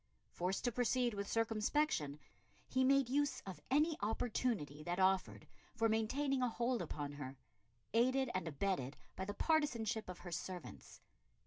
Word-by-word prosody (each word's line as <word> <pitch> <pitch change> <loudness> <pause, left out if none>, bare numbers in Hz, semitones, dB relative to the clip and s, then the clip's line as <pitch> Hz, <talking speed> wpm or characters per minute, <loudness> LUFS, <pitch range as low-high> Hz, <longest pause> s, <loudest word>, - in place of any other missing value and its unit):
Forced 180 +2 -1
to 245 - +2
proceed 245 0 +2
with 200 -1 -3
circumspection, 225 - +1 0.5
he 260 0 +2
made 275 0 +5
use 285 +3 +1
of 190 -2 -7
any 300 +4 +3
opportunity 210 - -1
that 175 +3 -2
offered 190 0 +2 0.3
for 225 -1 +3
maintaining 255 +5 +1
a 250 - +3
hold 240 0 0
upon 150 -3 -4
her, 135 -2 -7 0.6
aided 255 +3 +3
and 185 -2 -1
abetted 150 -3 -1 0.2
by 190 - -3
the 205 +1 -4
partisanship 240 - +1
of 180 - -5
her 175 - -5
servants. 175 +1 -6
220 Hz, 145 wpm, -38 LUFS, 180-255 Hz, 0.6 s, made